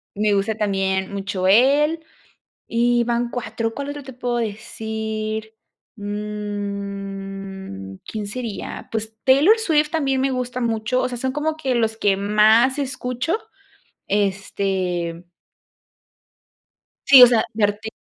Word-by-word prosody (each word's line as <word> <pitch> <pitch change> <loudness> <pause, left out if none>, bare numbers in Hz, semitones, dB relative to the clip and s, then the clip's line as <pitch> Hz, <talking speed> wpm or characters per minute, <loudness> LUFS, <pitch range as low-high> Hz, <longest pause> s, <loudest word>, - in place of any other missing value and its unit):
me 210 0 +2
gusta 200 +2 0
también 195 -2 0
mucho 195 -1 -2
él 280 +10 +4 0.7
y 240 +1 +2
van 235 0 0
4 230 -2 -3
¿Cuál 280 +2 -4
otro 290 0 -6
te 265 0 -10
puedo 245 -1 -2
decir? 220 0 -4 0.4
Mm, 200 - -5
¿quién 215 -2 -5
sería? 225 0 -6
Pues 220 0 -4
Taylor 285 +12 +6
Swift 310 -8 +2
también 275 -5 0
me 270 +1 +1
gusta 250 0 -3
mucho, 230 +1 0
o 255 - 0
sea, 250 - -5
son 260 +2 -1
como 310 +2 -1
que 270 -5 -1
los 225 -2 +1
que 205 -3 +2
más 215 +6 +4
escucho. 265 - -2 0.7
Este 190 -4 -1 1.8
sí 265 -2 +10
o - - +13
sea, 235 -2 +3
mi 220 - -2
arti 210 +2 -2
220 Hz, 125 wpm, -22 LUFS, 200-255 Hz, 1.8 s, o